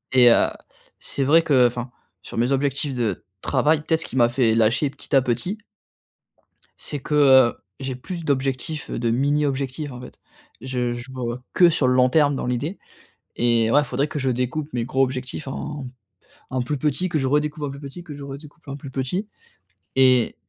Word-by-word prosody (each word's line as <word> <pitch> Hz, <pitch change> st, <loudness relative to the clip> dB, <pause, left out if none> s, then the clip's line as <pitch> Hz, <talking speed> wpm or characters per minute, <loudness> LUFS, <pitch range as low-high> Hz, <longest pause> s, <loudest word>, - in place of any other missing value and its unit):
Et 125 Hz, -2 st, +8 dB
heu, 115 Hz, -, +5 dB, 0.5 s
c'est 140 Hz, -, -3 dB
vrai 155 Hz, +5 st, +5 dB
que 140 Hz, -6 st, +4 dB
enfin, 120 Hz, +1 st, -1 dB, 0.3 s
sur -, -, -9 dB
mes 120 Hz, +3 st, +1 dB
objectifs 140 Hz, +1 st, 0 dB
de 115 Hz, -6 st, -2 dB, 0.2 s
travail 155 Hz, 0 st, +2 dB
peut-être 160 Hz, +1 st, 0 dB
ce -, -, -2 dB
qui -, -, -8 dB
m'a 120 Hz, -2 st, +4 dB
fait 120 Hz, -2 st, +2 dB
lâcher 115 Hz, +6 st, +2 dB
petit 140 Hz, -, -4 dB
à 135 Hz, -, +5 dB
petit 125 Hz, -, -1 dB, 1.2 s
c'est 145 Hz, -, -4 dB
que, 145 Hz, -, -5 dB
heu, 130 Hz, -4 st, +6 dB, 0.2 s
j'ai 135 Hz, -1 st, -4 dB
plus 170 Hz, +7 st, -7 dB
d'objectifs, 135 Hz, +2 st, -1 dB
de 115 Hz, -1 st, -1 dB
mini 145 Hz, +5 st, +2 dB
objectifs, 140 Hz, +1 st, -3 dB
en 125 Hz, -1 st, -9 dB
fait. 125 Hz, -, -12 dB, 0.4 s
Je 125 Hz, -1 st, -2 dB
je 120 Hz, +2 st, -8 dB
vois 125 Hz, -1 st, -4 dB
que, 175 Hz, -1 st, +6 dB
sur 150 Hz, -5 st, +2 dB
le 125 Hz, -, +3 dB
long 125 Hz, 0 st, +5 dB
terme, 145 Hz, 0 st, +3 dB
dans -, -, -3 dB
l'idée, 135 Hz, +10 st, -2 dB, 0.6 s
et 115 Hz, -1 st, +2 dB
ouais, 145 Hz, +3 st, +5 dB
faudrait 140 Hz, +1 st, -1 dB
que 150 Hz, 0 st, -4 dB
je 135 Hz, -1 st, 0 dB
découpe 125 Hz, +5 st, -2 dB
mes 120 Hz, -2 st, -1 dB
gros 130 Hz, +2 st, +1 dB
objectifs 130 Hz, +2 st, -4 dB
en 140 Hz, 0 st, -5 dB, 0.6 s
en 130 Hz, -1 st, -1 dB
plus 145 Hz, +4 st, -2 dB
petit, 150 Hz, +7 st, 0 dB
que 160 Hz, -, 0 dB
je 135 Hz, -, -1 dB
redécoupe 150 Hz, +2 st, 0 dB
en 145 Hz, -, -2 dB
plus 140 Hz, -, -9 dB
petit, 145 Hz, +5 st, -9 dB
que 155 Hz, -4 st, -9 dB
je 145 Hz, -, -10 dB
redécoupe 145 Hz, +3 st, -10 dB
en 140 Hz, 0 st, -5 dB
plus 140 Hz, -1 st, -9 dB
petit, 140 Hz, +11 st, -2 dB, 0.7 s
et 130 Hz, -3 st, +4 dB
135 Hz, 195 wpm, -23 LUFS, 125-150 Hz, 1.2 s, Et